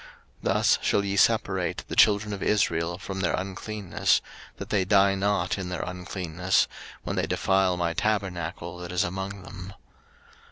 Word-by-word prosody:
03:015:031 - - -16 0.5
Thus - - +3
shall 100 - +1
ye 100 0 -1
separate 100 - +2
the - - -5
children 105 0 +4
of 100 - -6
Israel 85 -5 +1
from 95 +1 -6
their 95 - +1
uncleanness; 95 +1 0 0.4
that - - -8
they 100 -3 +3
die 100 0 +4
not 100 -1 0
in 90 -1 -4
their 90 - -3
uncleanness, 90 0 -1 0.4
when - - -3
they - - 0
defile 95 -2 +2
my 85 -1 0
tabernacle 90 -4 -2
that 90 0 -7
is 90 +2 +1
among 95 +1 -4
them. 95 +1 -9
95 Hz, 160 wpm, -26 LUFS, 90-100 Hz, 0.5 s, children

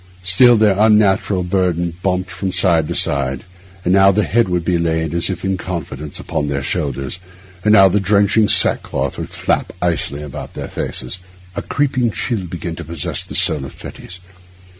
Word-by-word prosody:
Still 115 +7 +5
their 105 -2 +3
unnatural 105 -3 +3
burden 90 -2 -1
bumped 90 -1 -1
from 95 +2 -3
side 85 -5 +2
to - - -4
side; 65 -2 0 0.4
and 90 - +2
now 95 0 +6
the 105 +2 +1
head 115 -2 +1
would 90 -2 -1
be 85 -1 +1
laid, 80 -1 -1
as 85 +2 -1
if 95 -1 -4
in 95 0 0
confidence, 75 -5 -6
upon 75 - -3
their 70 -1 -2
shoulders, 70 -1 -3 0.4
and 105 - +4
now 95 -2 +7
the 100 +3 +1
drenching 105 +2 +2
sack - - +5
cloth 65 0 -4
would - - -5
flap - - -1
icily 80 -4 -2
about 75 -3 -8
their - - -6
faces. 75 +9 -5 0.4
A - - -3
creeping 130 -4 0
chill 110 -2 -3
began 85 0 -6
to 85 - -6
possess 80 -1 -3
the - - -5
soul 75 -4 +2
of 65 - -8
Fettes. 90 - -10
90 Hz, 185 wpm, -18 LUFS, 80-100 Hz, 0.4 s, now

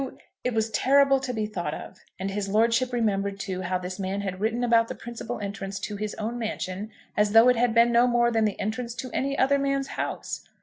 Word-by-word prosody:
It 250 -2 -1
was 220 0 0
terrible 275 +4 +4
to 260 -1 -3
be 220 -3 -1
thought 175 -7 -3
of. - - -10 0.2
And 195 +1 -3
his 200 0 -3
lordship 230 +4 +2
remembered, 200 -4 0
too, 190 -2 -3
how 185 0 -1
this 185 +2 -6
man 195 +1 -2
had 190 -2 -4
written 225 +4 0
about 230 -1 +4
the - - -5
principal 235 0 -6
entrance 195 -1 -5
to 210 - -4
his 210 +1 -4
own 230 +3 -4
mansion 210 -2 -4 0.3
as 210 0 +2
though 225 +2 +8
it 250 - +4
had 235 0 +1
been 235 +1 +6
no 235 +1 +5
more 240 -1 +3
than 225 -1 +2
the 210 - -2
entrance 235 +3 -3
to 255 -1 -6
any 275 +1 -1
other 280 +1 +3
man's 275 0 0
house! - - -4
225 Hz, 225 wpm, -26 LUFS, 200-245 Hz, 0.3 s, though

